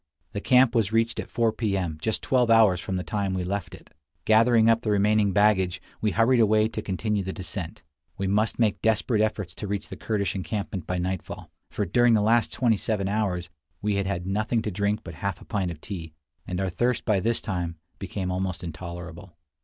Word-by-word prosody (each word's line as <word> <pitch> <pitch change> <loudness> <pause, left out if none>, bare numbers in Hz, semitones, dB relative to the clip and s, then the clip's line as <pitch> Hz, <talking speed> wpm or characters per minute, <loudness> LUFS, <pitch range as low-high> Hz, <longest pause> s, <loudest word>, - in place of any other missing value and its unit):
The 100 -3 -4
camp 125 0 +5
was 110 -4 +2
reached 115 +1 +1
at - - -5
4 115 -1 +1
P. 110 -3 -1
M., 85 -5 -3
just 110 +5 -1
twelve 125 -3 +2
hours 110 -6 +5
from 95 - -3
the 90 - -2
time 100 -2 -2
we 90 - -1
left 100 +1 -3
it. - - -18 0.3
Gathering 115 +1 +5
up 115 0 +4
the 110 - -2
remaining 105 0 +3
baggage, 95 -2 +3 0.2
we 110 - +2
hurried 115 +3 +3
away 110 -1 +4
to 110 - -4
continue 105 +1 -1
the 95 - -4
descent. 90 -4 -6 0.3
We 95 - -2
must 105 +3 +1
make 110 -4 +1
desperate 110 0 +2
efforts 105 -5 -1
to 105 - -6
reach 100 0 -3
the - - -6
Kurdish 100 -5 -1
encampment 95 0 -4
by 90 - -1
nightfall; 90 0 -4 0.2
for 105 - -2
during 120 +5 +4
the 105 - +3
last 115 +2 +3
twenty 120 -4 +2
seven 100 -2 -1
hours 95 -5 -1 0.3
we 105 0 0
had 100 -1 -1
had 95 -3 -2
nothing 110 +4 0
to 105 - -2
drink 100 +3 0
but 85 - -8
half 100 +2 -3
a - - -14
pint 95 -4 -1
of 85 -3 -7
tea, 80 -4 -7 0.3
and 90 0 -3
our 95 -1 -1
thirst 120 +7 0
by 105 -4 +2
this 115 +4 +1
time 90 -4 -3 0.2
became 95 -1 -4
almost 90 -1 -3
intolerable. 85 +1 -8
100 Hz, 210 wpm, -26 LUFS, 95-110 Hz, 0.3 s, camp